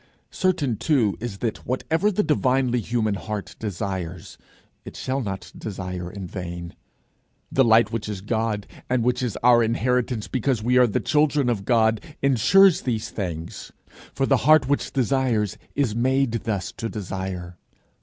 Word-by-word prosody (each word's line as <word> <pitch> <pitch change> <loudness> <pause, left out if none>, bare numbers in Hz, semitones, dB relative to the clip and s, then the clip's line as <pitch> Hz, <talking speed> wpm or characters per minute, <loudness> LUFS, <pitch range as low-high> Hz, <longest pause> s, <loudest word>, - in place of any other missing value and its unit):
Certain 145 - 0
too 120 -9 +2
it 115 - -4
is 105 -5 -5
that 115 +1 -3
whatever 160 +10 0
the 210 +1 +1
divinely 130 -5 +2
human 110 -1 -1
heart 105 0 -5
desires, 95 -4 -5 0.4
it - - -10
shall 135 +1 -2
not 95 -5 -5
desire 90 -4 -5
in 95 0 -7
vain. 85 -1 -6 0.8
The 135 - +4
light 110 -2 +5
which 110 -2 -3
is 100 -3 -5
God, 110 -1 -1 0.2
and 125 -2 +1
which 125 +1 +1
is 125 -5 -2
our 120 -1 +6
inheritance 120 0 0
because 125 -3 -1
we 125 +2 +3
are 125 - +6
the 105 - 0
children 150 -3 +2
of 100 -4 -3
God, 110 -1 +3 0.2
insures 155 - +5
these 115 -4 -2
things. 85 -5 -5 0.4
For 135 - 0
the 135 0 +3
heart 155 +3 +5
which 145 +1 0
desires 125 -6 0 0.2
is 140 -7 +1
made 130 +2 +1
thus 100 -4 -2
to 115 - -3
desire. 95 -3 -5
115 Hz, 155 wpm, -24 LUFS, 100-130 Hz, 0.8 s, our